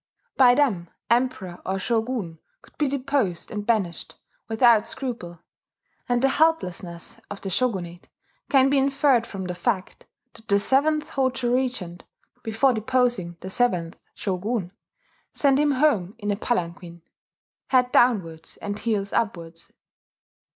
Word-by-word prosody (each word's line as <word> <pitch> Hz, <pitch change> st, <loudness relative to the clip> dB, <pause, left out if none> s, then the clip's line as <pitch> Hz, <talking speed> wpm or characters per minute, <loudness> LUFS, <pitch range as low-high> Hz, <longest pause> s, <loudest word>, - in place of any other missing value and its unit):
By 245 Hz, -2 st, +6 dB
them 210 Hz, -12 st, +1 dB, 0.2 s
Emperor 235 Hz, -8 st, 0 dB
or 190 Hz, +1 st, -2 dB
shogun 220 Hz, -5 st, -2 dB, 0.2 s
could -, -, -21 dB
be 295 Hz, -, +2 dB
deposed 265 Hz, -10 st, -1 dB
and 210 Hz, -2 st, -5 dB
banished 195 Hz, -8 st, -1 dB, 0.3 s
without 225 Hz, -1 st, +4 dB
scruple; 230 Hz, -11 st, -5 dB, 0.7 s
and 245 Hz, +1 st, +1 dB
the 270 Hz, -, +5 dB
helplessness 195 Hz, -, 0 dB
of 205 Hz, -, -8 dB
the 195 Hz, -, -4 dB
shogunate 180 Hz, -8 st, -2 dB, 0.4 s
can 270 Hz, -1 st, +4 dB
be 280 Hz, -, +4 dB
inferred 270 Hz, -3 st, +2 dB
from 190 Hz, -2 st, -6 dB
the 180 Hz, -, -3 dB
fact, 185 Hz, +1 st, -3 dB, 0.3 s
that 225 Hz, -1 st, -18 dB
the 200 Hz, -, +4 dB
seventh 300 Hz, +8 st, +2 dB
Hojo 260 Hz, -2 st, 0 dB
regent, 245 Hz, -10 st, -2 dB, 0.4 s
before 225 Hz, +4 st, +2 dB
deposing 230 Hz, -6 st, 0 dB
the 190 Hz, -, -6 dB
seventh 180 Hz, -8 st, +1 dB, 0.2 s
shogun, 195 Hz, 0 st, -2 dB, 0.6 s
sent 275 Hz, -1 st, +3 dB
him 295 Hz, -1 st, +3 dB
home 225 Hz, -, +1 dB
in 205 Hz, -2 st, -2 dB
a -, -, +1 dB
palanquin, 170 Hz, -6 st, -3 dB, 0.6 s
head 250 Hz, -1 st, +3 dB
downwards 180 Hz, -10 st, +1 dB
and 205 Hz, 0 st, -5 dB
heels 210 Hz, -3 st, -1 dB
upwards. 170 Hz, -7 st, -3 dB
225 Hz, 130 wpm, -24 LUFS, 180-255 Hz, 0.7 s, By